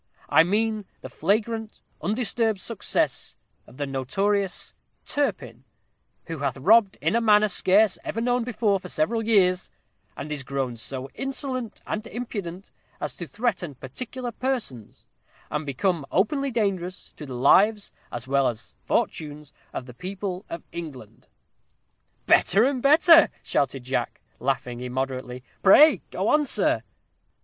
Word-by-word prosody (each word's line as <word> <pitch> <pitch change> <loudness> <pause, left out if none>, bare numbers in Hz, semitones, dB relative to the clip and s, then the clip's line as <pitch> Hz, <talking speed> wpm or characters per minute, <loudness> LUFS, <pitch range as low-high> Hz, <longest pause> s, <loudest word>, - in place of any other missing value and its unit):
I - - +6
mean 215 +3 0 0.2
the - - -8
flagrant, 220 +5 -1 0.2
undisturbed 220 +2 0
success 225 +2 -1 0.3
of - - -16
the 145 - -2
notorious 190 +9 -1 0.3
TURPIN, 290 -1 -2 0.6
who 165 -2 -6
hath 140 -2 -2
robb'd 200 - +4
in - - +2
a 235 - +3
manner 215 -1 +5
scarce 200 +1 +3
ever 225 - -3
known 245 +1 +1
before 220 -4 0
for 180 - -9
several 225 +10 0
years, 185 -5 +3 0.5
and 150 +2 -6
is 150 -2 -2
grown 135 -2 -3
so 130 +3 -5
insolent 265 -3 -4
and 215 +2 -4
impudent 200 -7 -6 0.3
as - - -3
to 175 - -7
threaten 185 - -2
particular 240 - -6
persons, 235 - -4 0.5
and 150 0 -3
become 165 +4 0
openly 275 +9 +1
dangerous 195 -6 -2
to 150 - -8
the 130 - -6
lives 205 - +4 0.2
as 120 +1 -6
well 140 0 +2
as 115 -3 -5
fortunes 150 -2 -2 0.2
of 125 - -5
the 125 - -11
people 185 - -5
of 170 - -6
England.'" 135 -10 -9 1.0
"Better 200 +5 +5
and 260 -1 +1
better," 315 +4 +7
shouted 135 -2 -1
Jack, 125 -1 -2 0.2
laughing 125 -2 -2
immoderately. 130 0 -4 0.2
"Pray 300 +11 +7
go - - -2
on, 300 -1 +3
sir." - - +2
190 Hz, 135 wpm, -25 LUFS, 140-225 Hz, 1.0 s, better